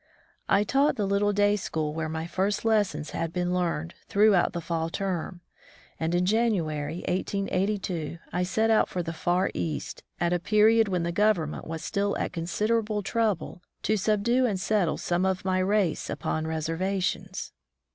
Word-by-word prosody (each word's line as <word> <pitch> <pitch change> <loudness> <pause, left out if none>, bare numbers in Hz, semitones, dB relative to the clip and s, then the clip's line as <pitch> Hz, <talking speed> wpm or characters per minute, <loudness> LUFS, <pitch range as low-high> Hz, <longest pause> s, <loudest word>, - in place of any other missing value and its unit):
I 200 +1 +4
taught 275 +7 +2
the 210 -4 -1
little 200 +1 +2
day 205 0 +3
school 155 -6 -2
where 160 0 -3
my 160 +1 -3
first 190 +5 -1
lessons 205 -9 +1
had 165 -1 -2
been 180 0 -1
learned, 170 -2 -1
throughout 200 -3 +4
the 175 - -3
fall 165 0 -2
term, 180 -1 -3 0.6
and 165 +2 0
in 180 +1 +2
January, 180 -8 0
1882, 185 -3 -1 0.2
I 180 - 0
set 220 +5 +1
out 220 - +4
for 180 - -2
the 165 0 -4
far 175 +3 +1
East, 155 -3 -4 0.2
at 175 0 +1
a 175 - +1
period 215 +4 +4
when 180 -3 0
the 170 - -1
Government 180 -5 +1
was 160 0 -5
still 200 -1 -1
at - - -3
considerable 210 +5 0
trouble 205 -5 -1 0.2
to 215 - +2
subdue 220 +5 +2
and 200 -5 -1
settle 190 -4 +1
some 175 +1 0
of 190 0 0
my 185 0 +1
race 190 -3 +1
upon 155 0 -2
reservations. 180 +3 -2
185 Hz, 165 wpm, -27 LUFS, 170-210 Hz, 0.6 s, I